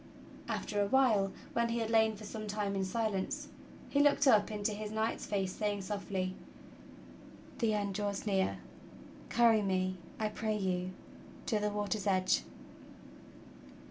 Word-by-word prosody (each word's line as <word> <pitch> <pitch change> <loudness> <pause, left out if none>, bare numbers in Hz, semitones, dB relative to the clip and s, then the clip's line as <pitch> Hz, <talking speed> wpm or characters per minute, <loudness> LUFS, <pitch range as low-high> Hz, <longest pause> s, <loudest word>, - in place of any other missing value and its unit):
After 205 - -1
a 200 - +2
while, 215 -6 +4 0.2
when 235 0 +1
he 230 - 0
had 225 -1 -1
lain 220 -1 +4
for 210 - -11
some 215 0 -6
time 205 -1 -1
in 195 - 0
silence, 200 -1 -2 0.4
he 285 - +1
looked 285 0 +5
up 215 -6 +5
into 210 0 -1
his 210 0 -4
knight's 220 +1 -1
face 195 -2 -1
saying 205 -2 -1
softly: 190 -2 -2 1.3
"The 225 -4 +2
end 200 -1 -1
draws 205 0 -2
near. 195 -2 +1 0.7
Carry 230 -2 +5
me, 185 -1 0 0.2
I 215 -1 +1
pray 215 0 -1
you, 185 -2 -1 0.5
to 220 -4 +1
the 210 0 0
water's 205 0 -2
edge." 185 -1 +3
210 Hz, 145 wpm, -33 LUFS, 195-220 Hz, 1.3 s, looked